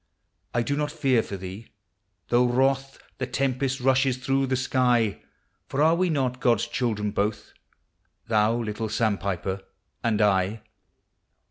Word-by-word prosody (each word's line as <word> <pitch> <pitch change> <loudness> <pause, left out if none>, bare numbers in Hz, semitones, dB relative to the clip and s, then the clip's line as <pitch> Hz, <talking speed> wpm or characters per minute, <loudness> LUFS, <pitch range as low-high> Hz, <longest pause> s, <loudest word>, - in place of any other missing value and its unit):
I 120 - +2
do 140 +5 -1
not 150 0 -1
fear 130 -5 +2
for 100 - -6
thee, 95 +4 -8 0.6
though 120 +1 +4
wroth 135 +2 +1 0.2
The 130 - -2
tempest 135 +1 -1
rushes 130 0 +2
through 135 +1 0
the 130 - +1
sky: 125 -4 +1 0.5
For 135 - -4
are 160 +1 +5
we 180 +1 +1
not 130 -5 0
God? 120 -5 +3
s - - -1
children 105 -4 -1
both, 105 +1 -2 0.7
Thou, 110 0 +3
little 110 -1 -3
sandpiper, 100 -4 -1 0.4
and 110 -3 +1
I? 105 +1 +2
120 Hz, 140 wpm, -26 LUFS, 105-135 Hz, 0.7 s, are